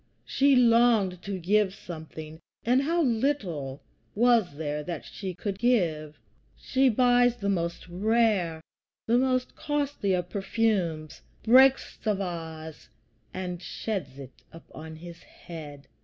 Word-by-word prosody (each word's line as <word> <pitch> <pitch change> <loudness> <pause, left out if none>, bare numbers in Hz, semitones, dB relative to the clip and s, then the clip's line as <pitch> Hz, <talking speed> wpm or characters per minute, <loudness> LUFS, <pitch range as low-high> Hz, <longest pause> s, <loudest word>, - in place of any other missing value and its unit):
She 275 0 +3
longed 230 -6 +4
to 195 0 -4
give 195 +2 +1
something, 160 -1 -9 0.3
and 250 +3 +3
how 335 +4 +1
little 215 - -1 0.3
was 225 -8 +3
there 150 -1 -3
that 150 -6 -6
she 190 - -6
could 195 +2 -4
give! 165 -11 +1 0.4
She 265 0 +2
buys 245 +1 +3
the 200 -3 -2
most 170 -2 -2
rare, 195 -3 +1 0.4
the 235 +2 +3
most 255 -1 0
costly 285 -10 -1
of 180 -1 -2
perfumes, 190 -6 -1 0.2
breaks 260 +4 +5
the 215 -2 -1
vase, 160 -4 -6 0.4
and 180 -2 -5
sheds 180 -15 -5
it 135 -2 -12
upon 160 -1 -11
his 170 +1 -11
head. 145 -4 -11
190 Hz, 125 wpm, -27 LUFS, 160-235 Hz, 0.4 s, breaks